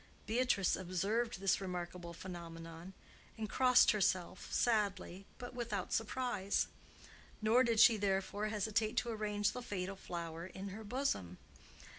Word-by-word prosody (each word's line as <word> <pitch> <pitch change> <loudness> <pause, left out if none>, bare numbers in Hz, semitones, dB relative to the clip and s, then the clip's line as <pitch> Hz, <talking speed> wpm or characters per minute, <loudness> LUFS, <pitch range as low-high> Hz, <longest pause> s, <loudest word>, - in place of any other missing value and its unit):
Beatrice 225 -3 +2
observed 195 +5 -1
this 195 0 +2
remarkable 180 -2 -5
phenomenon 170 0 -8 0.4
and 220 -1 -3
crossed 250 +2 +6
herself, 185 -3 0
sadly, 200 -4 0
but 245 0 -7
without 230 -6 -3
surprise; 225 -3 0 0.7
nor 225 +4 +4
did 230 -3 +2
she 225 0 +8
therefore 200 +1 0
hesitate 215 +2 0
to 240 - +1
arrange 210 -2 0
the 250 - -6
fatal 195 -4 -4
flower 170 -2 -6
in 190 +2 -7
her 215 +3 -7
bosom. 205 - -2
200 Hz, 125 wpm, -36 LUFS, 185-225 Hz, 0.7 s, she